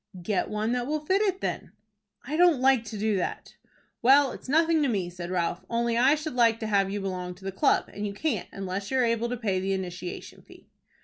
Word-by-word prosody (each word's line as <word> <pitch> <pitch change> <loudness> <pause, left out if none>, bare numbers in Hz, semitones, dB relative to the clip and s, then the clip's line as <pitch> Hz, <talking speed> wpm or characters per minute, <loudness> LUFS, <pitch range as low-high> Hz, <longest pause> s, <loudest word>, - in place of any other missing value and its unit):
"Get 205 0 -1
one 215 +2 -1
that 245 0 -1
will 305 +1 -1
fit 380 +5 +2
it 390 -3 0
then." - - -4 0.5
"I 300 - -3
don't 345 -4 +5
like 260 -2 +4
to 220 -1 -6
do 210 0 0
that." 180 - -4 0.5
"Well, 270 +2 +5
it's - - -10
nothing 320 +2 +3
to 290 - +2
me," 190 -6 -1
said 175 0 -7
Ralph, 175 -1 -1
"only 235 0 0
I 260 +5 +5
should 310 -1 -5
like 230 -2 +3
to - - -2
have 200 -2 +2
you 205 +1 -3
belong 180 -2 -4
to 190 +1 -15
the 195 - -2
club, 190 - +2
and 205 0 -3
you 200 - -5
can't 215 - -2
unless 195 +1 -5
you 265 - 0
are 255 - +3
able 230 0 0
to 245 - -3
pay 200 -5 -1
the 195 +1 -1
initiation 180 -1 -6
fee." - - -18
220 Hz, 235 wpm, -27 LUFS, 195-265 Hz, 0.5 s, don't